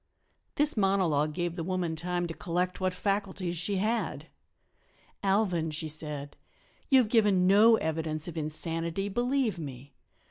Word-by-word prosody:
This 295 +1 +3
monologue 185 -8 +2
gave 175 +1 -3
the 170 - -3
woman 180 -2 -2
time 175 +2 -2
to 165 - -5
collect 180 +2 -2
what 185 0 +1
faculties 190 -2 -2
she 180 +5 -1
had. 220 +4 -1 0.9
"Alvan," 190 -5 +1
she 155 +1 -4
said, 150 -2 -5 0.5
"you 270 - +6
have 250 -4 +4
given 210 -5 +3
no 210 +4 +7
evidence 160 -3 -2
of 170 - -6
insanity, 165 +4 -2
believe 240 -2 0
me. 135 -2 -8
180 Hz, 140 wpm, -29 LUFS, 160-200 Hz, 0.9 s, no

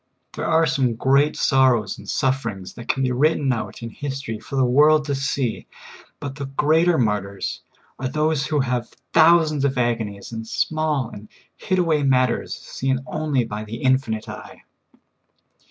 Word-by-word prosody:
There - - -3
are 165 0 +4
some 130 -5 +1
great 140 +5 +3
sorrows 130 -6 +2
and - - -11
sufferings 115 -8 -2
that 120 0 -10
can 135 - 0
be 130 - +1
written 140 +1 +2
out 115 0 -5
in 115 - -6
histor} 135 -5 -5
for 125 - -8
the 130 -1 +3
world 150 +4 +4
to 145 - -1
see; 135 -3 -2 0.5
but 140 -2 -5
the 140 -1 -6
greater 160 +5 +2
martyrs 100 -4 -2 0.4
are 130 - -2
those 150 +1 0
who 150 -2 +1
have 125 -2 -2 0.2
thousands 160 -3 +5
of 135 -1 0
agonies 115 -5 -2
in 115 -1 -5
small 150 -1 -1
and 105 -1 -11 0.3
hid 185 -2 -1
aw^ay 160 -5 +2
matters 130 -3 +1
seen 130 0 -3
only 150 -5 -1
by 105 -1 -5
the 110 +1 -7
Infinite 130 -4 +1
e3^e. - - -10
135 Hz, 160 wpm, -22 LUFS, 115-150 Hz, 0.5 s, thousands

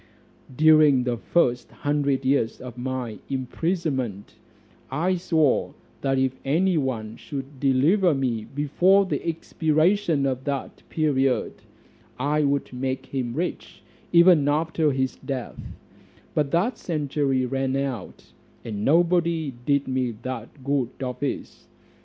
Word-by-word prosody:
"During 155 -3 +6
the 125 -1 0
first 125 -2 +1
hundred 140 -2 -1
years 130 -4 +1
of 125 -2 -8
my 125 -3 -4
imprisonment, 135 - -2 0.6
I 165 +8 0
swore 160 -5 +1 0.3
that 135 -1 +1
if 130 -1 +1
any 175 +7 +2
one 115 -7 -2
should 135 -1 -7
deliver 150 +7 +3
me 120 -5 -1
before 175 +8 +3
the 185 - -3
expiration 165 0 +1
of 130 -1 -1
that 140 -2 -4
period, 135 -5 +1 0.6
I 150 +3 +1
would 140 -2 0
make 130 +1 -3
him 125 -3 -3
rich, 175 +3 -4 0.3
even 170 -4 +6
after 155 +1 +1
his 130 -1 -1
death: 130 -4 -5 0.7
but 150 -2 +1
that 200 - 0
century 145 -5 0
ran 135 +1 -1
out, 135 -7 -4 0.3
and 105 -2 -4
nobody 170 -1 +2
did 140 -1 +2
me 130 -2 -1
that 130 +1 -7
good 140 -3 0
office. 125 +2 -4
140 Hz, 120 wpm, -24 LUFS, 130-160 Hz, 0.7 s, During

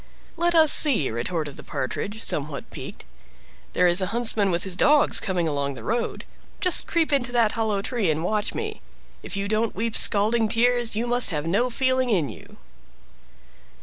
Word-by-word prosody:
"Let 345 0 0
us 315 -2 +6
see," 240 - +5
retorted 145 +5 -4
the - - -10
Partridge, 205 - -5
somewhat 145 -1 -2
piqued; - - -9 0.7
"there 180 - +2
is 175 +2 +3
a 185 - 0
huntsman 220 -3 0
with 175 0 -1
his 190 -2 -5
dogs 290 +9 +3
coming 180 -4 -2
along 140 -2 -3
the - - -11
road. 235 +2 -3 0.3
Just 365 -4 +3
creep 325 -2 0
into 250 -3 0
that 230 -3 +2
hollow 215 -4 -2
tree 230 -7 -1
and 155 +1 -1
watch 210 +3 -1
me; - - -5 0.4
if - - -7
you 200 0 -3
don't 215 +1 -1
weep 225 +2 -3
scalding 215 +2 +2
tears, 240 0 +1
you 225 +3 -2
must 245 0 +2
have 150 -4 -3
no 205 +9 0
feeling 260 0 0
in 170 - 0
you!" 110 - -13
215 Hz, 180 wpm, -23 LUFS, 175-245 Hz, 0.7 s, us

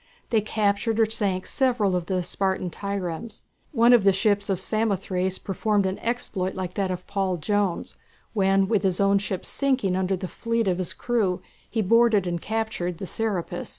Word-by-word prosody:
They 225 -2 +4
captured 215 +1 0
or 225 - +5
sank 200 -4 0
several 240 -8 +1
of 175 -2 -2
the 185 -2 0
Spartan 190 0 -1
triremes. 200 +2 -5 0.3
One 240 -3 +5
of 235 -4 +6
the 195 - +6
ships 205 +1 +1
of 190 -3 0
Samothrace 190 -3 -1
performed 205 +1 0
an 190 +1 -2
exploit 220 -5 -2
like 185 -1 -4
that 195 -1 -1
of 180 0 -4
Paul 195 -2 -1
Jones, 200 +2 -1 0.4
when 195 -2 +3
with 210 -1 +2
his 190 -2 0
own 200 0 +4
ship 195 -2 -4
sinking 260 -9 +1
under 190 +1 +1
the 185 0 -5
feet 230 +2 -1
of 185 -1 +1
his 185 - -2
crew 205 -7 0 0.3
he 225 -2 0
boarded 230 -1 +4
and 175 -1 -2
captured 220 -6 -2
the 195 - -5
"Serapis." 205 -3 -3
200 Hz, 180 wpm, -25 LUFS, 185-220 Hz, 0.4 s, of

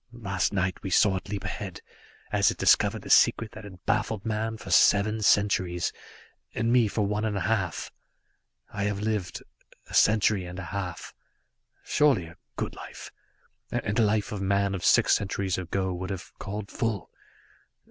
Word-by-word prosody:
Last 100 -5 -1
night 95 -1 -1
we 95 - -4
saw 95 +2 +4
it 95 - -8
leap 100 -1 -4
ahead, 95 -1 -5 0.5
as - - +4
it - - -3
discovered - - +3
the - - -9
secret 115 -2 +4
that 110 -1 -10
had 95 -3 -13
baffled 110 -2 -1
man 110 0 -2
for 105 -4 -9
seven 105 +4 +4
centuries, 95 -4 +2 0.6
and 115 +1 +1
me 120 -3 +5
for 105 0 -1
one 105 +2 -1
and 105 -2 -1
a - - -2
half. 90 -4 -1 0.8
I 100 -1 -2
have 105 -1 -1
lived 105 -4 -2 0.4
a - - -14
century 105 -2 +4
and 90 +1 -8
a 95 - -5
half. 95 -3 -5 0.7
Surely 145 - +2
a 80 +1 -14 0.2
good - - -3
life, - - -10 0.6
and 105 +4 -1
a - - +5
life 105 -1 +1
a 105 - -4
man 100 0 +1
of 90 -3 -4
six - - +5
centuries 95 -2 -2
ago 95 +1 -2
would 95 +1 -5
have 95 -2 -6
called 100 0 -6
full. 110 -6 -2
100 Hz, 170 wpm, -27 LUFS, 95-110 Hz, 0.8 s, me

